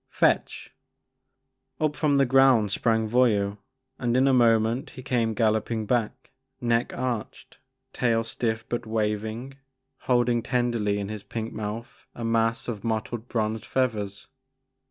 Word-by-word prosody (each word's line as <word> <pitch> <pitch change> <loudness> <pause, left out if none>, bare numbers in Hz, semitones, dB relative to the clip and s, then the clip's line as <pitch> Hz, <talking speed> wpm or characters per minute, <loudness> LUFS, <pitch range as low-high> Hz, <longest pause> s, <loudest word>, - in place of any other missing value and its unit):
'•Fetch!'' - - +1 1.1
Up 155 -1 0
from 150 -3 +2
the 140 -1 +4
ground 130 -5 +4
sprang 110 +1 +1
Voyou, 105 -4 +2 0.4
and 120 0 +1
in 130 +1 +4
a 135 - +4
moment 115 0 +3
he 130 - -11
came 115 -3 0
galloping 110 0 +1
back, 115 -1 -1 0.3
neck 120 0 +1
arched, 125 -4 -4 0.3
tail 115 -2 +1
stiff 110 -1 -3
but 120 -1 -3
waving, 110 +4 -2 0.5
holding 120 -1 +3
tenderly 120 -5 0
in 100 -1 -4
his 105 -1 -5
pink 110 +2 -5
mouth 110 +3 -6
a 120 - -5
mass 115 0 +1
of 110 -5 -4
mottled 115 +1 -3
bronzed 110 -2 -1
feathers. 105 -6 -2
115 Hz, 135 wpm, -26 LUFS, 110-125 Hz, 1.1 s, the